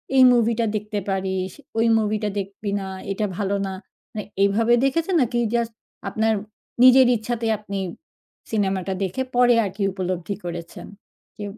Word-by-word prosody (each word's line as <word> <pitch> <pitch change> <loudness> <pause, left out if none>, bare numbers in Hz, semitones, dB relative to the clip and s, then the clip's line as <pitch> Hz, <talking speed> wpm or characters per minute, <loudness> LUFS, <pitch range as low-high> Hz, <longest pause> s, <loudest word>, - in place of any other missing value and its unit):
"এই 260 - +8
মুভিটা 230 -1 +2
দেখতে 210 0 -2
পারিস, 190 -1 -1 0.3
ওই 225 - +3
মুভিটা 210 0 -1
দেখবি 200 +1 -5
না, 195 - -5 0.3
এটা 210 +2 -1
ভালো 200 -1 0
না।" 190 - -4 0.4
না - - -3 0.2
এইভাবে 225 +4 +3
দেখেছেন? 330 +7 +1
নাকি 240 0 0 0.2
জাস্ট 235 -1 0 0.4
আপনার 220 0 +1 0.5
নিজের 255 0 +8
ইচ্ছাতেই 225 0 -2
আপনি 200 -1 -6 0.7
সিনেমাটা 190 -3 0
দেখে 190 +8 -2
পরে 245 -1 +5
আরকি 195 +2 -6
উপলব্ধি 185 0 -3
করেছেন 170 -1 -7 0.5
যে 210 - -6
210 Hz, 140 wpm, -23 LUFS, 195-235 Hz, 0.7 s, এই